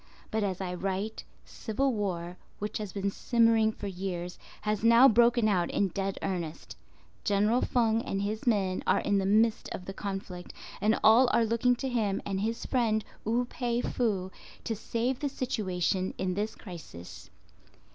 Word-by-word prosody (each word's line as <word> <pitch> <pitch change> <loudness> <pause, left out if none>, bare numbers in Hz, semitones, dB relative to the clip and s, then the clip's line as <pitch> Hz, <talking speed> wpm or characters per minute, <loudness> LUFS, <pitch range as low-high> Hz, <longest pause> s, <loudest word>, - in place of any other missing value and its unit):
But 220 - 0
as 190 -3 -2
I 180 -1 -3
write, 195 +4 -3 0.2
civil 260 +4 -1
war, 180 -5 -3 0.2
which 210 +1 -4
has 210 -3 -5
been 200 0 -2
simmering 230 -1 +3
for 210 - -9
years, 180 -2 -4 0.2
has 210 0 -1
now 235 +3 +8
broken 235 -1 +4
out 180 -5 +1
in 200 - +1
dead 195 +2 -3
earnest, 170 -4 -4 0.5
General 210 +4 +2
Feng 230 -2 +2
and 195 0 -2
his 215 +4 -3
men 195 -5 +1
are - - +3
in 200 -1 +1
the 190 - 0
midst 220 +2 +2
of 180 - -6
the 195 - -6
conflict 195 -3 -6 0.3
and 215 +2 +2
all 240 +4 +7
are 230 - +3
looking 235 +2 +2
to 265 +3 -4
him 220 -6 0
and 195 -1 -2
his 225 +2 -2
friend 225 -4 +1 0.2
Wu 235 +3 +1
pei 240 -1 -2
fu 200 -8 -1 0.3
to 225 - -2
save 235 +4 -2
the 290 - -1
situation 190 -8 -1
in 185 -1 -1
this 210 +3 -2
crisis. 165 - -10
210 Hz, 165 wpm, -29 LUFS, 190-230 Hz, 0.5 s, now